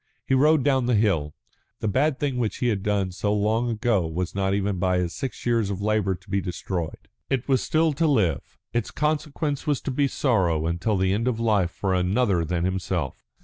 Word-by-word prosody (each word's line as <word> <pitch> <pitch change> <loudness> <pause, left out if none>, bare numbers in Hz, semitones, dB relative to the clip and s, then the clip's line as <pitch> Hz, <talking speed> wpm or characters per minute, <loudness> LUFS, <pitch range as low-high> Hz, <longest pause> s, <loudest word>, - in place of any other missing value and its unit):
He - - 0
rode 150 +2 +4
down 130 -3 +2
the 125 - +3
hill. 90 -9 +1 0.4
The - - -2
bad 135 +7 +1
thing 140 -4 -1
which 115 -3 -1
he 125 - +1
had 100 -4 0
done 100 -2 0
so 105 +3 -1
long 110 +3 +1
ago 110 -6 +1
was 85 +2 -3
not 95 0 0
even 100 -2 -1
by 90 0 +2
his 90 -1 -1
six 135 -2 -5
years 115 -4 +1
of 100 -2 -3
labour 105 -2 +1
to 90 +3 -20
be 100 -1 +1
destroyed. 90 -2 -4 0.2
It 135 -2 -1
was 135 -2 +3
still 160 0 +2
to 160 +3 +1
live, 95 - 0 0.2
its 120 -2 -1
consequence 150 -1 -2
was 145 -3 +2
to - - -3
be 140 +2 +2
sorrow 85 - +1
till 105 +4 0
the 95 0 +2
end 115 +4 0
of 120 -3 0
life 105 -6 +2
for 95 +2 -2
another 95 0 +2
than 85 +1 -1
himself. 90 -6 -3
105 Hz, 210 wpm, -25 LUFS, 95-130 Hz, 0.4 s, rode